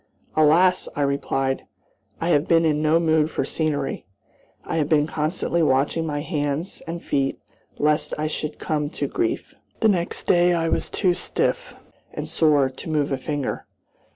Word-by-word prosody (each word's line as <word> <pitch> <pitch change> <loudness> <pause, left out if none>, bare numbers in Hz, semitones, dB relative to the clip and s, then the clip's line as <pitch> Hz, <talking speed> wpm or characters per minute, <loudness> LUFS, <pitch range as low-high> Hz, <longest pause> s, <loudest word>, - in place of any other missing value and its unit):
"Alas!" 170 +4 +4
I 145 - 0
replied, 135 -1 -1 0.5
"I 165 - -1
have 150 -2 +3
been 165 0 +4
in 150 -1 +2
no 155 +2 +3
mood 160 -2 +2
for - - -2
scenery. 150 -4 -2 0.6
I - - -2
have 150 -2 0
been 150 -2 +4
constantly 160 +2 -1
watching 150 +3 +1
my 145 -1 -2
hands 150 +2 -3
and 170 +1 -5
feet 135 -1 0 0.4
lest 150 0 +1
I 155 - -1
should 155 0 -3
come 150 -2 -2
to 145 - 0
grief." 345 - -2 0.3
The 220 - +5
next 175 -3 -1
day 175 0 +4
I 165 -1 0
was - - -1
too 185 -4 +2
stiff - - -2 0.4
and - - -4
sore 150 -4 +3
to 130 +4 -9
move 150 -2 0
a 135 - +1
finger. 145 0 -3
155 Hz, 165 wpm, -23 LUFS, 145-165 Hz, 0.6 s, The